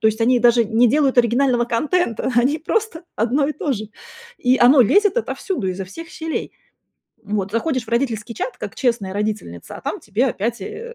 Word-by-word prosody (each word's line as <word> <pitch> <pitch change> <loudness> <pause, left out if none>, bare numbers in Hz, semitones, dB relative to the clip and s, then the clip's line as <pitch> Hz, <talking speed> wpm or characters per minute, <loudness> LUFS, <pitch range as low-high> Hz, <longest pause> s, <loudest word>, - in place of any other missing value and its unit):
То 220 - +3
есть 220 +1 +1
они 245 +2 +4
даже 235 -1 +4
не 230 +3 +3
делают 275 -1 +2
оригинального 240 +1 +3
контента, 260 - 0
они 265 +6 +3
просто 360 +2 -2
одно 250 +6 +1
и - - -1
то 295 -2 -2
же, 215 -2 -5 0.5
и 255 +1 +3
оно 255 +3 +6
лезет 410 - +4
отовсюду, 380 - -3
изо 185 +1 -4
всех 325 - -10
щелей. 320 -2 -5 0.7
Вот, 205 -2 -2
заходишь 255 +4 -1
в - - -22
родительский 235 -2 -1
чат, 365 - -5
как - - -7
честная 230 -7 -1
родительница, 205 - -4
а - - -11
там - - -4
тебе 215 +6 -1
опять, 235 0 -2
э 450 +3 -8
240 Hz, 185 wpm, -20 LUFS, 220-300 Hz, 0.7 s, оно